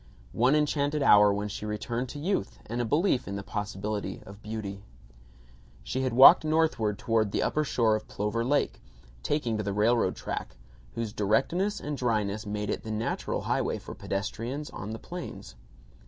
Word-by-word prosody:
One 125 +5 +3
enchanted 150 -1 +1
hour 105 -5 +7
when 100 +1 -2
she 105 - -6
returned 115 +4 -3
to - - -7
youth 155 - -2
and 120 +2 -3
a - - 0
belief 145 - +1
in 100 - -4
the 100 - -4
possibility 100 -1 -4
of 100 +2 -12
beauty. 105 -2 -5 1.0
She 130 - -2
had 130 -1 0
walked 130 +5 +9
northward 155 -10 +1
toward 110 -3 +1
the - - 0
upper 155 - +1
shore 115 -6 +2
of 110 - -5
Plover 105 +3 -2
Lake, 145 +4 0 0.4
taking 120 - -1
to 105 - -2
the 100 0 -2
railroad 105 -1 +2
track, - - -5 0.4
whose 115 -2 -3
directness 165 - +1
and 150 0 -4
dryness 110 -4 -1
make 105 0 -3
it - - -2
the 110 - -8
natural 110 +1 -2
highway - - 0
for - - -9
pedestrians 115 +8 -4
on 105 - -6
the 110 - -4
plains. 175 - -8
110 Hz, 170 wpm, -28 LUFS, 105-135 Hz, 1.0 s, walked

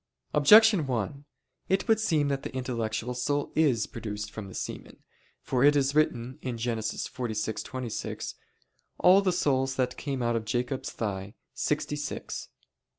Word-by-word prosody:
Objection 205 +2 +7
1: 130 +4 -3 0.4
It 190 +4 +1
would 225 -1 +4
seem 155 -9 +2
that 135 -1 -1
the - - -6
intellectual 120 -2 -2
soul 145 +4 -1
is 135 -9 +3
produced 105 -1 -6
from 110 -2 -7
the 95 - -10
semen. - - -7 0.4
For 125 0 +1
it 145 +1 +6
is 140 -1 +2
written 130 -3 +1
(Gen. 120 -2 -2
46:26): 110 +2 -4 0.6
"All 185 +2 +6
the 190 -2 +2
souls 135 -6 +1
that 125 -1 -1
came 135 -4 -3
out 120 0 +1
of 115 - -1
[Jacob's] 125 +4 -2
thigh, 100 0 -4 0.2
sixty 150 0 -1
six." 145 -1 -5
130 Hz, 145 wpm, -28 LUFS, 115-145 Hz, 0.6 s, Objection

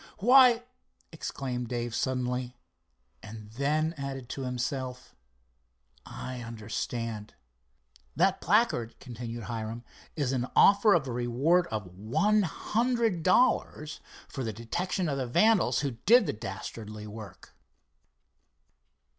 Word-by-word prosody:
"Why!" 245 +2 +6 0.5
exclaimed 130 -6 -4
Dave 120 -1 -3
suddenly—and 120 - -5
then 150 +6 0
added 135 -3 -5
to 135 - -5
himself: 125 0 -4 0.9
"I 130 -1 -6
understand!" 115 -1 -5 0.8
"That - - +2
placard," 180 - +1
continued 120 -2 -7
Hiram, 115 +1 -5 0.3
"is 140 -5 0
an 125 -2 -1
offer 200 +1 +6
of 145 -6 0
a - - -3
reward 130 +9 +2
of 110 -3 -4
one 115 - +1
hundred 225 +1 0
dollars 185 -6 +2 0.3
for 135 - -5
the 115 - -2
detection 170 - -2
of 140 -2 -1
the 130 - -2
vandals 215 - +3
who 140 -2 -1 0.2
did 245 +4 +7
the - - -1
dastardly 105 0 -7
work." 105 -1 -11
125 Hz, 110 wpm, -29 LUFS, 115-170 Hz, 0.9 s, did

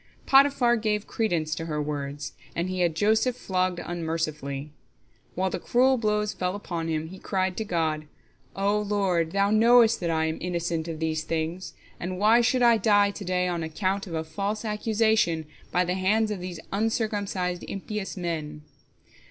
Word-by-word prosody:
Potiphar 270 -3 +5
gave 210 -1 -1
credence 170 -8 -1
to 165 - -4
her 150 -2 -2
words, 145 -1 -4 0.2
and 175 +2 -1
he 185 - -3
had 170 -3 +2
Joseph 220 +6 +2
flogged 185 -5 -1
unmercifully. 155 -5 -3 0.6
While 190 +1 0
the - - -2
cruel 255 +1 +3
blows 210 -1 0
fell 180 +1 -2
upon 170 -5 -4
him, 160 0 -2
he 190 +1 -10
cried 190 -2 -1
to 220 - -1
God, 160 -5 -1 0.5
"O 200 +2 +1
Lord, 195 -6 0
Thou 200 +2 +2
knowest 230 +1 +5
that 175 - -2
I 160 -1 +1
am 160 0 -2
innocent 170 -2 -2
of 165 -1 -4
these 160 -1 -1
things, 165 +3 -3 0.3
and 185 +1 -4
why 220 +4 +5
should 245 +1 +2
I 235 -1 +6
die 205 -2 +4
to 200 - -8
day 180 0 0
on 175 -2 -2
account 190 +5 -2
of 165 - -5
a 160 - -1
false 205 +6 -3
accusation 215 -6 +1 0.3
by 180 +1 +2
the 180 - -1
hands 210 +4 +1
of 205 - -3
these 180 -2 -6
uncircumcised, 205 -4 -1
impious 200 0 -5
men?" 155 -4 -4
185 Hz, 170 wpm, -26 LUFS, 165-210 Hz, 0.6 s, I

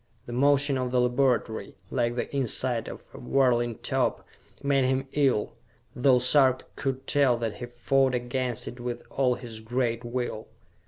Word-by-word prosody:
The 120 - -7
motion 140 +1 +3
of 125 -1 -1
the 125 0 +1
laboratory, 125 -2 0 0.2
like 120 -2 0
the 125 - -4
inside 125 -2 0
of - - -10
a - - -10
whirling 120 -4 +1
top, - - -1 0.4
made 140 -1 +2
him 130 +1 0
ill, 135 -7 +1 0.4
though 125 0 +4
Sarka 130 +1 +3
could 135 -1 -3
tell 135 -4 +3
that 115 -3 -3
he 120 - -6
fought 130 +2 +1
against 125 0 -3
it 120 - -7
with 120 0 -5
all 130 -2 +2
his 115 -3 -9
great 115 +1 -1
will. 120 -2 -4
125 Hz, 160 wpm, -27 LUFS, 120-135 Hz, 0.4 s, though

